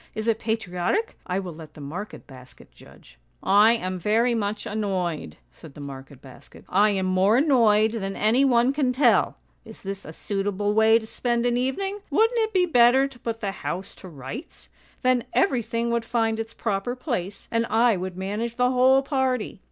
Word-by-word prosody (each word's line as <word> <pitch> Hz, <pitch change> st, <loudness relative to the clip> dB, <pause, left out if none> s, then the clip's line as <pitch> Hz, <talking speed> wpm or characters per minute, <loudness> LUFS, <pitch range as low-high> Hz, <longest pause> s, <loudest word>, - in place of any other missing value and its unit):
Is 220 Hz, +1 st, -4 dB
it 225 Hz, -1 st, +1 dB
patriotic? 220 Hz, -, -2 dB
I 180 Hz, 0 st, -1 dB
will 185 Hz, -3 st, -4 dB
let 155 Hz, -1 st, -12 dB
the -, -, -12 dB
market 170 Hz, +9 st, -7 dB
basket 130 Hz, -2 st, -15 dB
judge.' -, -, -18 dB
" -, -, -40 dB
' -, -, -30 dB, 0.2 s
I 230 Hz, -, +6 dB
am 185 Hz, -5 st, -3 dB
very 225 Hz, +6 st, +2 dB
much 210 Hz, -2 st, -2 dB
annoyed,' 185 Hz, -, -3 dB
said 150 Hz, -, -14 dB
the -, -, -11 dB
market 135 Hz, -1 st, -10 dB
basket. 130 Hz, -, -15 dB
' -, -, -25 dB
I 205 Hz, +3 st, +4 dB
am 195 Hz, -2 st, 0 dB
more 185 Hz, +4 st, +3 dB
annoyed 225 Hz, -7 st, +4 dB
than 195 Hz, -4 st, -4 dB
any 230 Hz, +6 st, +3 dB
one 250 Hz, 0 st, +3 dB
can 270 Hz, -3 st, 0 dB
tell! 245 Hz, -, +3 dB, 0.3 s
Is -, -, -12 dB
this 195 Hz, 0 st, -5 dB
a -, -, -9 dB
suitable 205 Hz, +3 st, -2 dB
way 220 Hz, +1 st, +5 dB
to 225 Hz, -, -5 dB
spend 235 Hz, +1 st, -1 dB
an 240 Hz, 0 st, +1 dB
evening? 385 Hz, +12 st, -2 dB
Wouldn't 450 Hz, -, +2 dB
it 440 Hz, -1 st, 0 dB
be 370 Hz, -3 st, +3 dB
better 260 Hz, -3 st, +5 dB
to 265 Hz, -3 st, -16 dB
put 225 Hz, -1 st, -5 dB
the 200 Hz, -2 st, -2 dB
house 190 Hz, -1 st, -5 dB
to 190 Hz, -, -11 dB
rights? 165 Hz, -, -8 dB, 0.3 s
Then 255 Hz, -1 st, +3 dB
everything 235 Hz, -, 0 dB
would 235 Hz, -1 st, 0 dB
find 225 Hz, -1 st, 0 dB
its 225 Hz, 0 st, -6 dB
proper 210 Hz, +3 st, -2 dB
place, 235 Hz, -, -4 dB
and 230 Hz, 0 st, 0 dB
I 230 Hz, 0 st, +3 dB
would 185 Hz, 0 st, -5 dB
manage 210 Hz, +5 st, -3 dB
the 250 Hz, +1 st, +2 dB
whole 260 Hz, +1 st, +4 dB
party. 260 Hz, -6 st, -1 dB
220 Hz, 195 wpm, -24 LUFS, 190-245 Hz, 0.3 s, I